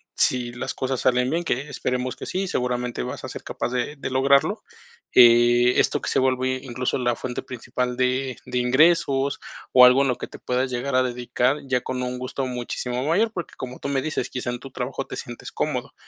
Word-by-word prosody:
si 125 -2 +1
las 125 +1 -4
cosas 130 -1 -2
salen 125 0 +2
bien, 170 +3 -1
que 140 +1 -2
esperemos 125 -2 -2
que - - -7
sí, 190 +1 -2
seguramente, 125 - -2
vas - - -6
a - - -6
ser - - -8
capaz - - -3
de 125 +4 -2
de 140 - -5
lograrlo, 135 +1 +3 0.5
eh, 120 0 +6
esto - - +2
que - - -3
se - - +2
vuelve 130 0 +1
incluso 125 -1 -2
la 120 -2 0
fuente 125 +1 -4
principal 125 0 -4
de 130 0 0
de 125 0 -3
ingresos 140 +2 +3 0.3
o 125 -1 +9
algo 125 +2 +6
en 140 - +2
lo 125 - 0
que - - -6
te - - -11
puedas 125 +1 -1
llegar 130 +2 -2
a 130 - +4
dedicar 125 +2 0
ya 125 -2 +1
con 125 -1 -3
un 125 0 -3
gusto 130 +1 -3
muchísimo 125 0 -3
mayor, 215 +8 +2
porque 175 -6 -6
como 130 0 -7
tú - - -5
me 135 -1 0
dices, 155 -5 -2
quizá 125 -1 -4
en 120 - -5
tu 135 - -10
trabajo 130 +2 -4
te - - -6
sientes 120 -1 -8
cómodo, - - -2
125 Hz, 215 wpm, -24 LUFS, 125-135 Hz, 0.5 s, o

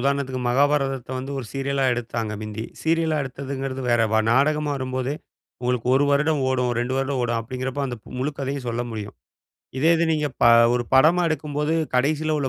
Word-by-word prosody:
உதாரணத்துக்கு, 135 -1 -1
மகாபாரதத்தை 135 -1 +1
வந்து 135 +2 -5
ஒரு 125 - -5
சீரியலா 135 0 -1
எடுத்தாங்க 115 -2 -3
மிந்தி. 110 +1 -5 0.2
சீரியலா 160 -1 +1
எடுத்ததுங்கிறது 135 0 -5
வேற. 120 -1 +3
வ 110 - +4
நாடகமா 150 +2 +2
வரும்போதே 130 +1 -2 0.5
உங்களுக்கு 125 -1 -1
1 140 - +4
வருடம் 150 0 +2
ஓடும். 125 -2 +1
2 125 +2 -2
வருடம் 135 -1 -1
ஓடும். 120 -1 0
அப்படிங்கிறப்போ, 130 +4 -4
அந்த 120 -2 -5 0.2
முழு 135 +4 0
கதையும் 135 -1 -3
சொல்ல 120 +1 -1
முடியும். 105 -2 -6 0.6
இதே 160 +5 +4
இது 170 - +2
நீங்க 150 -1 0 0.2
ப - - +6 0.3
ஒரு 120 -1 0
படமா 165 +6 +5
எடுக்கும்போது, 150 0 -1 0.2
கடைசியில 155 +3 +1
உள்ள 135 -2 -1
135 Hz, 170 wpm, -23 LUFS, 125-145 Hz, 0.6 s, ப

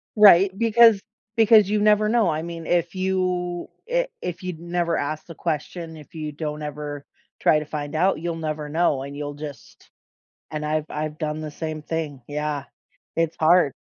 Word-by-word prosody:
Right, 195 -2 +8
because 230 -2 +6 0.3
because 220 -3 +6
you 210 0 +2
never 210 0 +4
know. 225 -6 +3
I 155 0 -1
mean, 165 -1 -6
if 175 +1 0
you 185 -2 -1 0.2
i - - +2
if 180 +1 -5
you'd 180 -3 -5
never 170 0 -1
ask 155 +2 -3
the 165 - -10
question, 165 +1 -4
if 150 +1 -14
you 155 -1 -4
don't 150 0 -5
ever 150 -1 -5 0.3
try 155 - +4
to 150 - -6
find 150 0 -5
out, 180 0 +2
you'll 170 0 -3
never 155 -2 -3
know 150 -3 +1
and 140 +1 -7
you'll 145 0 -4
just 145 -2 -10 0.6
and 155 -1 -4
I've 155 0 -1
I've 155 0 -4
done 155 -1 -2
the 155 -1 -5
same 155 0 -5
thing, 150 -5 -4
yeah. 150 -1 -2 0.5
It's 165 -1 0
hard. 160 -3 +5
160 Hz, 180 wpm, -24 LUFS, 150-180 Hz, 0.6 s, Right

